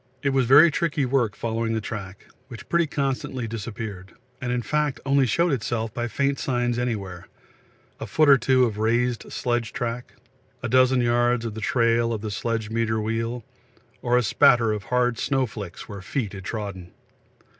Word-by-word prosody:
It 140 - +2
was 130 -3 +2
very 150 +6 +8
tricky 150 -3 0
work 125 -5 +1
following 115 0 -2
the - - 0
track, 100 -3 -7 0.2
which 120 -3 -10
pretty 170 -1 +2
constantly 135 -3 -2
disappeared, 105 -3 -6 0.3
and 125 -2 -2
in 125 -1 -1
fact 150 -1 -1
only 135 -1 +3
showed 170 +9 +2
itself 115 -3 -2
by 120 0 -2
faint 140 +5 -1
signs 120 -2 0
anywhere 100 -8 -4 0.7
a - - -5
foot 155 -1 +3
or 140 -2 +7
two 130 -1 +3
of 105 -3 -3
raised 120 +2 0
sledge 120 -2 -2
track, 120 +1 -4 0.5
a - - -1
dozen 130 +1 +4
yards 120 0 +2
of 115 - -4
the 110 - -7
trail 115 +1 +2
of 110 - -4
the 110 -1 -4
sledge 110 0 -2
meter 110 -1 0
wheel, 115 +2 -2 0.6
or 125 0 +2
a 125 - +2
spatter 115 +2 +4
of 105 -2 -5
hard 125 -1 +1
snow 135 -2 +1
flicks 105 -6 -8
where 100 -2 -8
feet 105 +1 -3
had 95 -2 -8
trodden. 100 -5 -5
120 Hz, 175 wpm, -24 LUFS, 110-130 Hz, 0.7 s, very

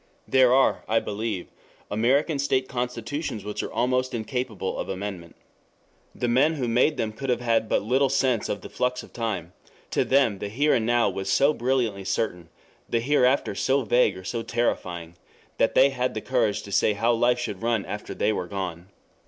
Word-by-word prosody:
There 130 -2 +5
are, 135 +1 +3
I 115 +1 +4
believe, 105 -4 -4 0.4
American 135 +8 +2
state 130 -2 +1
constitutions 120 -1 -4
which 105 - -3
are - - -5
almost 130 0 0
incapable 115 -3 -3
of - - -4
amendment. 95 -3 -6 0.8
The 120 - -1
men 135 +7 +3
who 130 -5 -2
made 125 +6 +2
them 110 -1 -2
could 135 +4 -5
have 125 - +2
had 115 -2 +1
but - - +1
little 130 +5 +2
sense 130 -4 +1
of 100 - -3
the - - -9
flux 125 0 -1
of - - -15
time: 100 -7 -3 0.4
to - - +2
them 130 -7 +2
the 100 - -4
Here 145 +8 +2
and 110 -1 +1
Now 120 0 +3
was 95 0 -4
so 140 +9 +4
brilliantly 120 -6 0
certain, 95 -4 -2 0.4
the 115 - +1
Hereafter 130 +1 +2
so 135 0 +1
vague 115 -3 +2
or 95 - -9
so 115 +4 -3
terrifying, 90 -8 -2 0.4
that - - +2
they 140 - +6
had 125 -2 -2
the 110 - -3
courage 115 -5 0
to 100 - -10
say 105 - +3
how 115 +4 +2
life 120 +1 +2
should 120 - -4
run 115 -3 0
after 105 - -6
they 110 - +1
were 90 -3 -3
gone. 90 -3 -5
115 Hz, 190 wpm, -25 LUFS, 105-130 Hz, 0.8 s, they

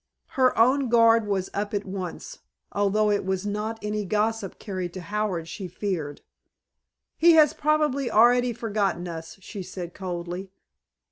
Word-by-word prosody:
Her 260 -1 +2
own 255 +3 +4
guard 230 -2 +5
was 195 -2 -1
up 205 +1 -2
at 205 - -2
once, 190 - -6 0.3
although 205 +1 +2
it 205 - +1
was 190 +1 -2
not 210 +2 -3
any 210 0 -2
gossip 210 0 -1
carried 185 -4 -5
to 185 - -5
Howard 185 -2 -2
she 190 +2 -6
feared. 175 -6 -4 1.0
"He 340 +1 +7
has 310 -3 +6
probably 295 -3 +1
already 245 +3 +5
forgotten 205 -6 -1
us," 165 +1 -7
she 195 +1 -7
said 180 -1 -7
coldly. 180 0 -5
205 Hz, 145 wpm, -25 LUFS, 185-230 Hz, 1.0 s, He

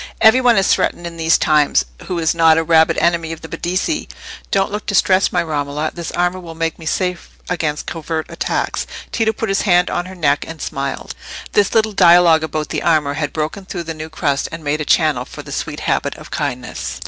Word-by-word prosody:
"Every 225 +3 +6
one 240 -3 +4
is 195 - +4
threatened 175 - -1
in 170 -1 -7
these 165 0 +3
times, 150 -2 +3 0.2
who 180 - -2
is 165 -2 +1
not 165 -1 +5
a 165 - +2
rabid 160 0 +4
enemy 170 -1 +1
of 160 - -10
the - - -8
Medici. 185 - -2 0.4
Don't 195 +1 +1
look 210 +1 -5
distressed, 190 -1 +3
my - - +1
Romola—this 155 +2 -3
armour 180 +1 0
will 165 -2 -9
make 165 0 -2
me 160 - -8
safe 180 +1 -2
against 155 -4 -2
covert 160 -1 -4
attacks." - - -2 0.2
Tito 225 -1 +1
put 220 0 -4
his 195 +1 +1
hand 180 -3 +3
on 175 +1 -2
her 190 - -9
neck 145 -4 +1
and 165 -1 -8
smiled. 140 -2 -4 0.4
This 205 +1 +2
little 220 -1 +3
dialogue 175 -3 +6
about 155 0 -3
the - - -2
armour 155 -4 +2
had 145 0 -2
broken 155 +5 -3
through 180 -2 -5
the 165 0 -5
new 155 0 -7
crust, 140 -3 -1
and 165 -1 -7
made 150 +1 -1
a - - -2
channel 150 -7 +2
for - - -10
the - - -10
sweet - - -4
habit - - -1
of - - -13
kindness. 60 0 -4
165 Hz, 210 wpm, -18 LUFS, 155-185 Hz, 0.4 s, Every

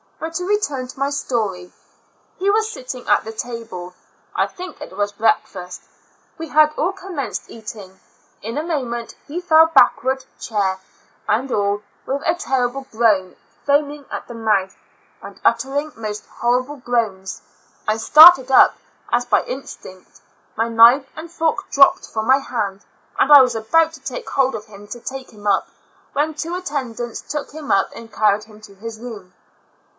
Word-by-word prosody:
But 320 +1 -5
to 360 - -2
return 295 -11 -1
to 255 - -12
my 275 +1 +1
story. 215 -10 -3 0.6
He 390 +2 0
was 435 +2 +1
sit 255 -12 -11
ting; 250 -1 -6
at - - +3
the 220 - -6
table; 225 -6 -7 0.4
I - - +2
think 365 +1 -10
it - - -9
was 205 0 -1
breakfast: 200 -4 -1 0.6
we 325 - -5
had 305 0 +4
all 330 +6 0
commenced 355 - -6
eating; 210 -4 -10 0.4
in 230 +5 -5
a 300 - -1
moment 250 -8 -3
he 335 +5 -4
fell 320 -2 +6
backward 265 -3 +3
chair, 195 -4 -1 0.5
and 250 +5 0
all, 205 0 0 0.2
with 275 +1 -2
a 330 - +3
ter 265 -7 0
rible 270 +1 -9
groan, 215 -5 +2 0.3
foaming 285 0 +1
at - - -6
the 240 - -8
mouth, 210 -4 0 0.5
and - - -11
uttering 270 +6 +1
most 215 -2 -6
horrible 255 +4 -1
groans; 225 -7 -2 0.5
I 215 +1 +1
started 300 +3 +8
up 260 - +6 0.4
as - - +2
by - - +2
instinct; 185 - -10 0.3
my 225 +1 0
knife 230 +4 +6
and 320 +2 -9
fork 335 +3 -1
dropped 275 -1 +4
from 220 -1 -3
my 265 +1 +5
hands, 205 -7 -4 0.4
and 285 - +3
I 290 -2 +11
was 250 -2 +2
about 320 +9 +2
to 310 - -11
take 270 -2 -6
hold 265 -2 +1
of 215 -1 -7
him 205 -1 -14
to 240 - -7
take 265 +2 -7
him 210 -1 -15
up, 200 -2 +2 0.5
when 300 +3 0
two 325 +3 -4
attendants 255 -9 -4
took 295 -1 -5
him 300 -1 -6
up 195 - +2
and 230 0 -11
carried 210 0 +2
him 215 -1 -17
to 205 -2 -14
his 220 +2 -8
room. 210 -6 -9
245 Hz, 170 wpm, -20 LUFS, 215-295 Hz, 0.6 s, I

